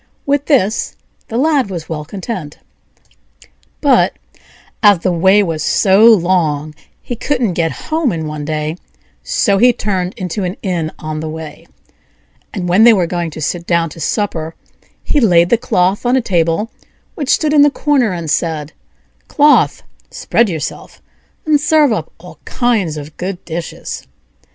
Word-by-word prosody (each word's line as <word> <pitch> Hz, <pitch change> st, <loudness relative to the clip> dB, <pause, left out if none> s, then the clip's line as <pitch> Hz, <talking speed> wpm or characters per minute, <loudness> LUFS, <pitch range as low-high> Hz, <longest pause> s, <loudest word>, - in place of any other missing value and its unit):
'" -, -, -43 dB
With 285 Hz, 0 st, +1 dB
this 230 Hz, -8 st, +1 dB, 0.3 s
the 225 Hz, -, -4 dB
Lad 280 Hz, -4 st, +2 dB
was 170 Hz, -4 st, -6 dB
well 150 Hz, -2 st, -5 dB
content. 185 Hz, -4 st, -6 dB, 1.2 s
But, 280 Hz, -3 st, +3 dB, 0.7 s
as 205 Hz, -3 st, +6 dB
the 180 Hz, +2 st, -1 dB
way 190 Hz, +4 st, +4 dB
was 160 Hz, -4 st, -3 dB
so 195 Hz, +3 st, +3 dB
long 170 Hz, -8 st, +3 dB, 0.3 s
he 245 Hz, -, -6 dB
couldn't 245 Hz, -5 st, -1 dB
get 165 Hz, -1 st, 0 dB, 0.2 s
home 315 Hz, -6 st, +1 dB
in 160 Hz, -3 st, -4 dB
one 150 Hz, -1 st, -5 dB
day, 155 Hz, +2 st, -3 dB, 0.4 s
so 200 Hz, -5 st, +1 dB
he 245 Hz, +3 st, +6 dB
turned 190 Hz, -5 st, -3 dB
into 185 Hz, +2 st, -4 dB
an 180 Hz, +1 st, -4 dB
inn 170 Hz, -5 st, -2 dB
on 155 Hz, 0 st, -5 dB
the 155 Hz, 0 st, -5 dB
way; 155 Hz, -1 st, -9 dB, 0.8 s
and 185 Hz, -4 st, -4 dB
when 185 Hz, +5 st, +4 dB
they 235 Hz, 0 st, +8 dB
were 185 Hz, -5 st, +2 dB
going 170 Hz, 0 st, -3 dB
to 155 Hz, 0 st, -9 dB
sit 170 Hz, +3 st, -3 dB
down 170 Hz, -2 st, +1 dB
to 165 Hz, -, -11 dB
supper 165 Hz, -2 st, -2 dB, 0.5 s
he 295 Hz, -, +1 dB
laid 175 Hz, -8 st, +4 dB
the -, -, +6 dB
cloth 190 Hz, -5 st, 0 dB
on 245 Hz, +1 st, +2 dB
a -, -, +4 dB
table 175 Hz, +1 st, 0 dB, 0.4 s
which 290 Hz, -5 st, -5 dB
stood 305 Hz, -1 st, +2 dB
in 295 Hz, -, +6 dB
the 290 Hz, -, +6 dB
corner, 280 Hz, -6 st, +1 dB
and 170 Hz, -4 st, -4 dB
said: 155 Hz, -2 st, -2 dB, 0.5 s
"Cloth, 295 Hz, 0 st, +3 dB, 0.3 s
spread 235 Hz, -2 st, 0 dB
yourself, 160 Hz, -4 st, -6 dB, 0.5 s
and 300 Hz, -2 st, +2 dB
serve 300 Hz, -4 st, +3 dB
up -, -, -4 dB
all -, -, -14 dB
kinds 215 Hz, -11 st, -1 dB
of 150 Hz, +1 st, -9 dB
good 180 Hz, 0 st, -5 dB
dishes." 165 Hz, 0 st, -6 dB
185 Hz, 160 wpm, -15 LUFS, 165-235 Hz, 1.2 s, they